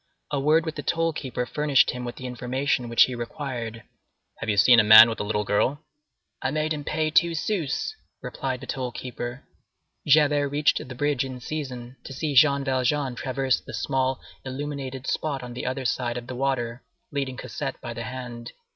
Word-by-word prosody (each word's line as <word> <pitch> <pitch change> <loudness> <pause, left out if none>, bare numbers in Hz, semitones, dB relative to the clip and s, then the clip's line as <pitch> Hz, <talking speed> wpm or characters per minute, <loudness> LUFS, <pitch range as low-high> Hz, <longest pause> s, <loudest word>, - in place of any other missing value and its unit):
A 145 - 0
word 155 +4 +3
with 160 - -3
the - - -3
toll 165 +1 0
keeper 130 -4 -3
furnished 145 0 +3
him 125 0 -6
with 120 - -5
the 130 - -8
information 125 0 -1
which 115 - +6
he 130 - -1
required: 120 -2 -5 0.6
"Have 110 - -4
you 105 - +1
seen 120 +4 +7
a - - +6
man 110 +2 +10
with 110 - -5
a - - -1
little 105 0 -1
girl?" 130 +9 0 0.6
"I - - 0
made 155 +2 0
him 150 -1 -5
pay 155 +1 -1
two 170 +1 +4
sous," 175 - -2 0.2
replied 130 -2 -4
the - - -7
toll 130 -1 -3
keeper. 120 +1 -6 0.6
Javert 145 -1 +4
reached 145 +2 +2
the 130 0 -8
bridge 145 -1 +1
in 130 -1 -6
season 130 -3 -6
to - - -8
see 150 +2 -2
Jean 140 0 +5
Valjean 130 +1 0
traverse 130 +1 0
the - - -8
small 130 0 0 0.2
illuminated 135 -1 -5
spot 140 -3 -2
on 125 -1 -7
the 125 - -5
other 130 +1 -3
side 120 +1 -1
of 120 - -6
the 125 - -6
water, 125 -2 -1 0.3
leading 135 -3 -3
Cosette 135 -1 -5
by 120 - -6
the 115 - -6
hand. 125 -1 -7
130 Hz, 190 wpm, -25 LUFS, 125-145 Hz, 0.6 s, man